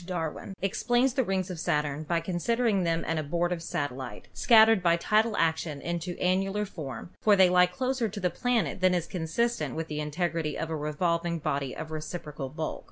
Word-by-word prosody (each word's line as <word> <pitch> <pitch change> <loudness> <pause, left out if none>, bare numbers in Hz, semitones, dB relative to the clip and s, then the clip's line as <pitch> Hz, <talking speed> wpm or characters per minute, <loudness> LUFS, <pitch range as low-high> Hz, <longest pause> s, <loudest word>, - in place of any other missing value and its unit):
Darwin 175 +1 -4
explains 240 +6 +2
the 265 0 +2
rings 190 -3 -1
of 175 - -6
Sa 150 -1 +1
turn 145 0 -4
by 165 +2 0
considering 200 +5 +1
them 165 0 0
an 160 0 -1
abortive 170 +3 -1
satellite, 135 -5 -4
scattered 225 -3 +6
by 170 -1 +3
tidal 215 +5 +2
action 160 -2 0
into 170 +2 -4
annular 195 +3 +1
form, 150 - -7
for 210 -2 +5
they 190 -2 +5
lie 180 0 +6
closer 255 +4 -1
to 205 +1 -6
the 180 -2 0
planet 225 - 0
than 185 -1 +4
is 175 -2 -1
consistent 165 - -1
with 160 0 -3
the 150 0 -3
integrity 155 0 -2
of 165 0 -3
a - - -1
revolving 170 +3 -1
body 140 -4 -2
of 160 0 -7
reciprocal 155 -3 -5
bulk. 155 +2 -4
170 Hz, 185 wpm, -28 LUFS, 155-195 Hz, -, scattered